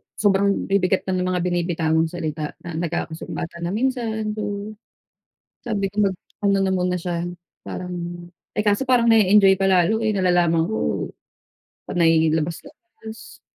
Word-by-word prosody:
sobrang 200 -1 +2
bibigat 190 -1 +2
na 190 - -2
ng 180 - 0
mga 180 -1 0
binibitawang 165 -2 +1
salita 155 -3 -4
na 170 -2 -5
nagkakasumbatan 170 0 -4
na - - -2
minsan, 225 -3 -1
gano'n. 205 0 -4 0.9
Sabi 210 -5 -2
ko 210 - -1
mag-ano 195 +1 -2
na 190 - +1
muna 180 -1 0
siya 175 0 -3 0.3
parang, 180 0 -6 0.6
eh, 210 - +1
kaso 210 +5 +1
parang 245 -2 +4
na-e-enjoy 200 -2 +6
pa 195 - +3
lalo 190 +4 +3
eh, 215 -2 0
nalalaman 175 -3 +3
ko 220 +5 -2 0.8
panay 165 -2 +3
labas-labas, 220 - -6
190 Hz, 135 wpm, -22 LUFS, 170-210 Hz, 0.9 s, na-e-enjoy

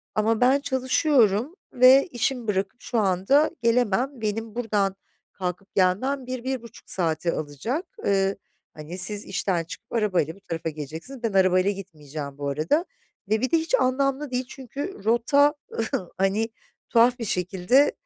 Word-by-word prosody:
"Ama 220 +2 +1
ben 260 +3 +5
çalışıyorum 260 - +2 0.2
ve 255 +2 +7
işimi 245 -3 -2
bırakıp 195 +3 -2
şu 240 - -3
anda 200 +10 +3
gelemem, 245 +2 +1
benim 220 +1 -3
buradan 205 -5 0 0.4
kalkıp 185 +1 -5
gelmem 250 +9 +1
1-1.5 255 -2 -5
saati 170 -1 +1
alacak. 155 - -3 0.2
Iıı, 195 0 +2 0.4
hani, 155 +4 -8
siz 205 +3 +2
işten 185 -2 -1
çıkıp 165 - -11
arabayla 185 -8 +1
bu - - -18
tarafa 165 -4 -4
geleceksiniz, 160 - -7
ben 225 - -1
arabayla 185 0 +4
gitmeyeceğim 150 -7 -8
bu 140 -1 -3
arada 160 - +1 0.4
ve 220 +1 +2
bir 260 - 0
de 335 - +5
hiç 325 +9 +1
anlamlı 275 - 0
değil 255 +1 -1
çünkü 275 - -7
rota, 280 +6 +4 0.6
hani, 200 +4 +1 0.4
tuhaf 240 +2 +4
bir 230 - -3
şekilde 190 +9 +2
220 Hz, 140 wpm, -25 LUFS, 185-260 Hz, 0.6 s, ve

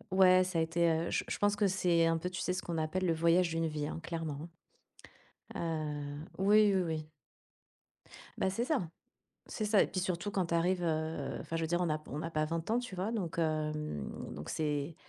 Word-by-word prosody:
ouais, 185 -1 +7
ça 180 -2 -1
a - - +3
été, 165 +1 +2
heu, 165 +1 0
je - - +1
je - - -2
pense 205 0 +3
que 205 0 +2
c'est 175 -3 +3
un 165 0 +2
peu, 180 - -3
tu 185 - -5
sais, 180 - 0
ce 185 - -2
qu'on 170 -2 -4
appelle 160 +4 -1
le 165 - +3
voyage 170 +2 +3
d'une 165 0 0
vie, 150 -1 -3
hein, 165 - -5
clairement, 165 -2 -4 1.1
hein, 150 -3 -3 0.2
heu, 190 - 0
oui, 210 0 +6
oui, 190 - +3
oui. 155 -2 -4 1.3
Bah, 190 - +2
c'est 230 +6 -1
ça 255 - 0 0.6
c'est 215 - -3
ça 210 -1 +5
et - - +1
puis 185 - -2
surtout 180 +2 -2
quand 190 -3 0
tu 170 - -2
arrives, 175 +2 +2
heu 155 -3 -1
enfin, 165 - -4
je 165 - -1
veux - - +1
dire 175 +2 0
on 175 - +1
a 155 0 0
p 155 - -18
on 150 - -3
a 165 - -3
pas 155 -1 +1
20 165 +5 -3
ans, 235 - +3
tu 245 -6 -5
vois, 190 +5 -2
donc, 180 -8 -3
hem, 155 - -1 0.3
donc, 75 - -7
c'est 150 0 -1
165 Hz, 230 wpm, -33 LUFS, 155-185 Hz, 1.3 s, ouais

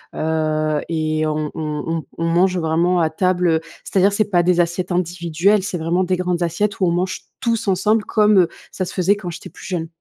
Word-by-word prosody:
heu 155 -1 0
et 155 -1 0
on 155 0 -2
on 150 -1 -3
on 165 -1 -2
on 165 - -1
mange 180 +2 +2
vraiment 170 +2 +1
à 160 -2 +2
table, 180 +2 +1
heu, 160 -1 +2 0.2
c'est-à-dire 195 +1 +3
c'est 210 +2 +1
pas 175 -3 +3
des 180 0 +2
assiettes 175 +2 0
individuelles, 175 +3 +1
c'est 190 -2 -3
vraiment 170 +3 0
des 185 0 0
grandes 180 -1 -1
assiettes, 185 +5 -1
où 185 - +4
on - - +2
mange 180 +2 -1 0.2
tous 230 -3 -1
ensemble 210 +3 +2
comme, 210 -1 +3
heu, 175 - +4 0.2
ça 185 - -3
se - - -7
faisait 190 +2 +2
quand 200 -3 -6
j'étais 165 - -8
plus - - -13
jeune. 170 -3 -2
175 Hz, 215 wpm, -20 LUFS, 160-185 Hz, 0.2 s, où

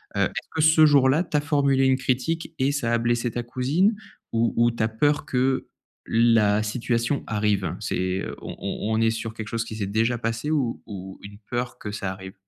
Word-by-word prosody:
Heu, - - +1
est-ce - - -5
que 160 - +1
ce 155 0 +6
jour-là 145 +2 +4
tu 155 - -6
as 145 - +3
formulé 140 -3 +2
une 130 - +3
critique 135 +6 -1
et 135 +2 +2
ça 120 -5 -1
a 120 - +3
blessé 120 0 0
ta 120 - -3
cousine 145 - +1 0.4
ou 115 0 +1
ou 120 0 +4
tu 115 -1 -2
as 110 - +3
peur 145 +7 +1
que 130 0 0 0.4
la 115 -2 +3
situation 120 +4 -1
arrive? 105 -4 0
C'est 95 0 -1
heu, - - -5
on - - -7
on 110 +1 -3
on 110 - +1
est 115 - +4
sur 110 0 -4
quelque 110 -1 -7
chose 115 0 -1
qui 110 - -7
s'est 100 -3 -3
déjà 115 +4 +1
passé 115 +6 -2
ou 135 -7 0
ou 95 -3 -8
une 100 0 -11
peur 120 0 -3
que 105 - -6
ça 100 -2 -3
arrive? 95 0 -10
120 Hz, 215 wpm, -24 LUFS, 110-135 Hz, 0.4 s, ce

